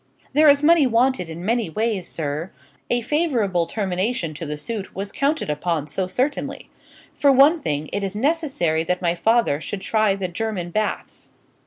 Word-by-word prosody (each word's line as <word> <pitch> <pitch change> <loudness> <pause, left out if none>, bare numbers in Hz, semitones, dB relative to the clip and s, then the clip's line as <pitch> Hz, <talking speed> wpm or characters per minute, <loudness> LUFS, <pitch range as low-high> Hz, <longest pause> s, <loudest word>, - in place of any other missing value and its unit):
"There 305 +2 +5
is 285 0 +4
money 320 -3 +5
wanted 240 -6 +1
in 165 +2 -7
many 230 -2 0
ways, 210 0 -1
sir; 155 +2 -3 0.4
a 240 0 +1
favourable 230 - 0
termination 190 -3 -2
to 155 +1 -6
the 150 0 -4
suit 200 +6 -6
was 200 +1 -5
counted 290 +3 0
upon 150 +1 -1
so 180 +5 -2
certainly. 260 +10 -2 0.4
For 280 - +4
one 285 +5 +5
thing, 150 - -2
it 200 - -1
is 195 +1 -3
necessary 265 - 0
that 180 +2 -1
my 170 -1 +2
father 195 -4 +2
should 195 +4 -5
try 215 0 +2
the 195 -2 -3
German 180 -2 -4
baths." 215 +2 -3
200 Hz, 170 wpm, -22 LUFS, 170-250 Hz, 0.4 s, There